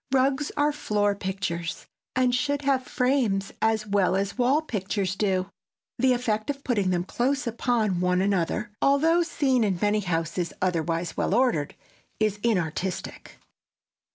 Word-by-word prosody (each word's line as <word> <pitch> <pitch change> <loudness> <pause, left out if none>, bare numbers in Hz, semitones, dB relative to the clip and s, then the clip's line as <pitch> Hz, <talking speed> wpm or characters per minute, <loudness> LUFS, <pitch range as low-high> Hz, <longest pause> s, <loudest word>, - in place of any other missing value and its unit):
Rugs 270 +2 +2
are 295 0 +3
floor 210 -8 0
pictures 185 -4 -4 0.3
and 255 -1 +2
should 285 +3 0
have 270 -2 +2
frames 245 -7 +1
as 220 -1 +1
well 200 -3 +2
as 200 +1 -1
wall 260 +5 +2
pictures 195 - -2
do. 190 -2 0 0.5
The 260 -1 +4
effect 220 -2 -1
of 280 -1 -3
putting 205 -7 +1
them 175 -1 +1
close 260 +8 -1
upon 230 -5 0
one 180 0 +2
another, 200 +2 0
though 320 +5 +4
seen 270 -7 +1
in 195 -4 +1
many 210 +1 +2
houses 170 -2 -2
otherwise 170 -2 -1
well 195 - 0
ordered, 235 - +1 0.4
is 215 -1 +1
inartistic. 185 -4 -2
210 Hz, 140 wpm, -26 LUFS, 185-255 Hz, 0.5 s, The